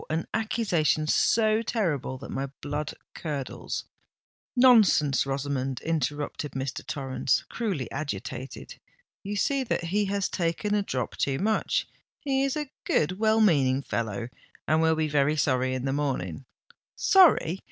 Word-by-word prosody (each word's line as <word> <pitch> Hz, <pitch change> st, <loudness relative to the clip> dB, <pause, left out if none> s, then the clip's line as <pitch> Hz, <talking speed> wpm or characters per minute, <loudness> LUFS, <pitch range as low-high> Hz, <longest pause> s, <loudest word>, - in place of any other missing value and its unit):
an 160 Hz, +1 st, -1 dB
accusation 180 Hz, -9 st, +1 dB
so 215 Hz, +7 st, +3 dB
terrible 170 Hz, -, -1 dB
that 135 Hz, -, -9 dB
my 135 Hz, +1 st, -2 dB
blood 145 Hz, +1 st, -3 dB, 0.2 s
curdles——" 145 Hz, -5 st, -4 dB, 0.7 s
"Nonsense, 215 Hz, -, +5 dB
Rosamond!" 135 Hz, -1 st, -2 dB
interrupted 150 Hz, -1 st, -2 dB
Mr. 135 Hz, -1 st, -4 dB
Torrens, 135 Hz, -2 st, -1 dB
cruelly 195 Hz, -, -2 dB
agitated: 130 Hz, -2 st, -6 dB, 0.4 s
"you 205 Hz, +1 st, -4 dB
see 275 Hz, +6 st, +1 dB
that 230 Hz, -, -1 dB
he 200 Hz, +5 st, 0 dB
has 200 Hz, 0 st, 0 dB
taken 175 Hz, +4 st, -1 dB
a 210 Hz, -, +3 dB
drop 130 Hz, -10 st, -3 dB
too 135 Hz, -1 st, 0 dB
much—he 245 Hz, -, -1 dB
is 275 Hz, +1 st, 0 dB
a 295 Hz, -3 st, -4 dB
good 185 Hz, +6 st, 0 dB
well 220 Hz, 0 st, +3 dB
meaning 140 Hz, -9 st, +3 dB
fellow—and 115 Hz, +8 st, -3 dB
will 160 Hz, 0 st, +3 dB
be 155 Hz, 0 st, 0 dB
very 150 Hz, +1 st, +2 dB
sorry 130 Hz, -2 st, +1 dB
in 130 Hz, 0 st, -3 dB
the 135 Hz, -, 0 dB
morning——" 130 Hz, -, -2 dB, 0.5 s
"Sorry! 305 Hz, -, +5 dB
155 Hz, 130 wpm, -27 LUFS, 135-210 Hz, 0.7 s, Nonsense